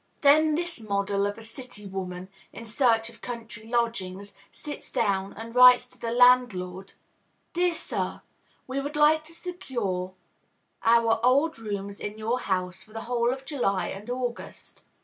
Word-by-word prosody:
Then 305 +2 +5
this 345 -3 -2
model 200 -1 0
of 205 +1 -5
a 225 - -10
city 230 -2 -8
woman, 185 -1 -6 0.2
in 230 - -9
search 225 -1 +2
of 230 - -19
country 225 -2 -7
lodgings, 205 -5 -2 0.2
sits 295 -1 -7
down 195 -3 0
and 225 +1 -9
writes 250 0 +8
to 255 - -14
the 230 - -3
landlord: 230 -7 +3 0.6
"Dear 350 0 +2
Sir, - - -3 0.4
We 260 +1 -3
would 290 +2 -5
like 305 +1 +4
to 320 - -7
secure 230 - -4 0.7
our 230 -1 +4
old 280 +4 +3
rooms 200 -2 -5
in 210 +1 -5
your 225 +3 -1
house 185 -3 -2
for 215 +2 -17
the 225 - -5
whole 240 0 0
of 265 +1 -6
July 240 - 0
and 205 +4 -8
August. 245 -1 -5
230 Hz, 155 wpm, -27 LUFS, 200-255 Hz, 0.7 s, writes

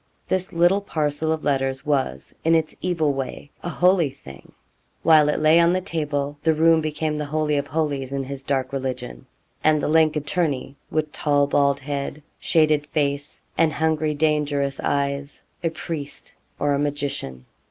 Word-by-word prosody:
This 185 0 -1
little 175 +4 +3
parcel 155 -4 -1
of 160 -1 -2
letters 135 -1 0
was, 135 - -1
in 165 +1 +4
its 160 -1 0
evil 160 -5 +1
way, 135 +2 -5
a 175 - -4
holy 180 -3 +3
thing. 70 - -13 0.5
While 155 -2 +6
it - - 0
lay 155 +2 +5
on 170 +1 +4
the 185 - +2
table, 145 -5 -2
the 160 0 +2
room 165 +1 +4
became 155 0 -2
the 150 - -2
holy 155 0 0
of 140 0 -1
holies 145 -4 -2
in 140 0 -2
his 135 0 -6
dark 135 -1 -1
religion; 130 - -4 0.4
and 155 -1 +4
the - - -1
lank 155 0 +4
attorney, 145 -3 -1
with 155 -1 -1
tall 145 -1 +2
bald 140 0 +2
head, 140 +1 -4 0.2
shaded 155 -2 +2
face, 145 -1 -2 0.2
and 160 -2 +4
hungry 155 -1 0
dangerous 145 -2 0
eyes, 140 0 -2 0.2
a 165 - +2
priest 155 -3 -6 0.2
or 145 0 +1
a 140 - +1
magician. 140 - -3
150 Hz, 165 wpm, -23 LUFS, 140-160 Hz, 0.5 s, While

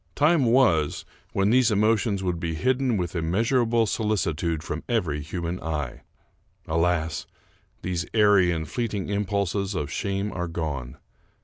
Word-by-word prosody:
Time 150 -1 +4
was, 110 - +3 0.3
when 100 +2 +2
these 125 -1 +5
emotions 105 -1 +2
would 90 -2 -1
be 80 -1 -2
hidden 130 - +1
with 90 -2 -2
immeasur 100 +10 +1
able 115 0 +3
solicitude 85 -8 -1
from 80 0 -4
every 85 -11 0
human 85 +3 -4
eye. 75 -6 -4 0.7
Alas! 80 -1 0 0.6
these 90 -1 -2
airy 105 -4 +5
and 80 -2 -2
fleeting 110 -1 -3
impulses 100 -1 -1
of 75 -3 -3
shame 100 +6 -2
are 90 -1 -3
gone. 75 -6 -4
95 Hz, 135 wpm, -25 LUFS, 80-110 Hz, 0.7 s, these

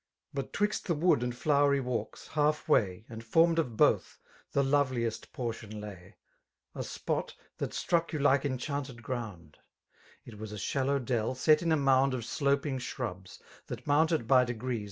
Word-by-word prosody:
But 140 -1 -4
'twixt 210 +1 -1
the 170 - +1
wood 165 -4 +3
and 125 0 -2
flowery 140 0 +3
walks, 120 -4 -4
halfway. 145 - +1
And 115 0 -8
formed 165 +8 +4
of 120 -9 -2
both, - - +3 0.3
the 140 - +2
loveliest 130 -5 0
portion 115 -3 -5
lay, 100 -4 -10 0.6
A - - -4
spot, - - -3 0.2
that - - -2
struck 170 -1 0
you 155 - -2
like 140 -1 +3
enchanted 135 -2 -3
ground: 105 -11 -6 0.3
— - - -29
It 110 -4 -11
was 110 -1 -6
a 105 - -6
shallow 135 +7 0
dell, 120 -2 -1
set 155 +4 +4
in 170 -1 0
a 160 - +4
mound 135 -1 +3
Of 120 -3 -4
sloping 140 -1 0
shrubs, 95 -7 -6 0.2
that - - -7
mounted 155 -3 +2
by 130 -1 +6
degrees. 125 0 -3
130 Hz, 165 wpm, -30 LUFS, 115-145 Hz, 0.6 s, by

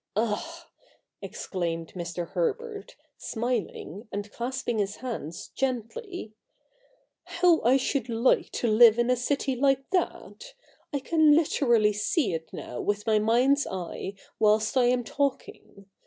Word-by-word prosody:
Ah,' 280 +11 -2 0.5
exclaimed 165 -3 -4
Mr. 175 -1 -5
Herbert, 415 - -3 0.2
smiling, 225 -3 -4
and 205 +1 -5
clasping 240 -1 -3
his 200 0 -1
hands 225 - -6
gently, 265 - -4 0.5
' - - -39
how 350 -3 +5
I 255 +3 +4
should 270 0 -1
like 230 +2 +2
to 240 - -1
live 225 0 +7
in 240 +1 +2
a - - +4
city 265 +2 -1
like 270 +1 +2
that! 475 +6 -3 0.4
I 285 - -2
can 315 0 +4
literally 240 -9 +3
see 210 - 0
it 160 0 -5
now 125 - -6
with 205 0 -1
my 215 -1 +3
mind's 250 +6 +3
eye, 190 +1 -5 0.2
whilst 215 +2 +3
I 255 -2 +4
am 245 0 +2
talking. 270 -6 -4
240 Hz, 135 wpm, -27 LUFS, 210-275 Hz, 0.5 s, live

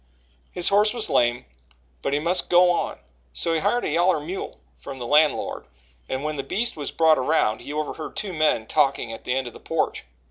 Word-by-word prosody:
His 175 -1 +1
horse 210 +3 +3
was 230 -2 -2
lame 120 0 +2 0.6
but - - -2
he 145 - +2
must 170 +5 0
go 180 0 +6
on: 175 - -2 0.4
so 165 - 0
he 160 - +1
hired 205 +7 0
a - - -1
"yaller" 175 -1 +2
mule 175 +6 -6 0.2
from 135 -1 -8
the 125 - -6
landlord, 150 - +2 0.4
and 130 +1 -3
when 155 0 -3
the - - -1
beast 225 - -1
was 145 -3 -4
brought 160 -3 +4
around, 130 -5 +1
he - - -8
overheard 155 +1 -4
two 200 -3 -4
men 155 -8 +1
talking 135 -4 +1
at - - -10
the 125 - 0
end 130 0 -1
of 120 - -8
the - - -12
porch. - - -2
155 Hz, 210 wpm, -24 LUFS, 135-180 Hz, 0.6 s, go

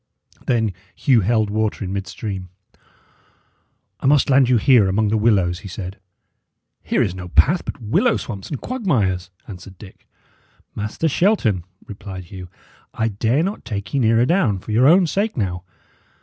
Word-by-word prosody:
Then 110 -5 +1 0.2
Hugh 125 -5 +3
held 110 +1 +1
water 110 -1 -1
in 95 - -4
midstream. 100 -1 -5 1.5
"I - - -1
must 145 0 +3
land 130 -1 +4
you 125 - +4
here 115 -4 +4
among 105 +2 +1
the 110 - +1
willows," 95 -6 +2
he 100 - -10
said. 95 +1 -7 0.8
"Here - - +1
is 90 - -2
no 90 -1 -7
path 165 - +3
but - - -6
willow 125 - +1
swamps 100 -5 -7
and 145 - -4
quagmires," 110 - -1 0.2
answered 95 -1 -11
Dick. 95 0 -15 0.7
"Master 105 +10 -2
Shelton," 135 - +1 0.2
replied 95 -2 -8
Hugh, 90 +1 -10 0.5
"I 110 - 0
dare 115 +8 0
not 195 +4 -4
take 100 +1 -6
ye 140 - +1
nearer 115 0 +3
down, 145 - +2
for 95 - -8
your 120 +5 +4
own 180 +4 +6
sake 200 +4 -1
now. 90 -5 -2
110 Hz, 160 wpm, -20 LUFS, 95-130 Hz, 1.5 s, own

